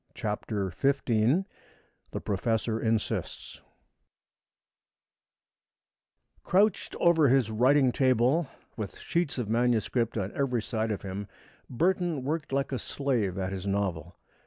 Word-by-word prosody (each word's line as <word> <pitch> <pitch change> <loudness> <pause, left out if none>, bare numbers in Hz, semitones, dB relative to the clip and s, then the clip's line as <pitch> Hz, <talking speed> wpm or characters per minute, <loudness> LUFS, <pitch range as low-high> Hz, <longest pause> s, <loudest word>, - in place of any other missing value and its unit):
CHAPTER 105 -3 -3
XV 135 - +2 0.6
THE - - -5
PROFESSOR 110 +2 -1
INSISTS 110 -1 -2 2.8
Crouched 200 +2 +2
over 165 -4 +5
his 125 -4 +3
writing 130 +4 +4
table, 130 +5 +2 0.3
with 105 -5 -6
sheets 170 -5 -1
of 120 -4 -2
manuscript 115 0 +1
on 100 -1 -2
every 125 -5 0
side 110 0 -2
of 105 - -3
him, 100 +1 -5 0.4
Burton 170 +1 0
worked 150 +2 -3
like 140 +1 0
a 130 - -2
slave 120 -10 -1
at 95 0 -2
his 95 0 -5
novel. 90 -4 -2
120 Hz, 110 wpm, -28 LUFS, 105-140 Hz, 2.8 s, over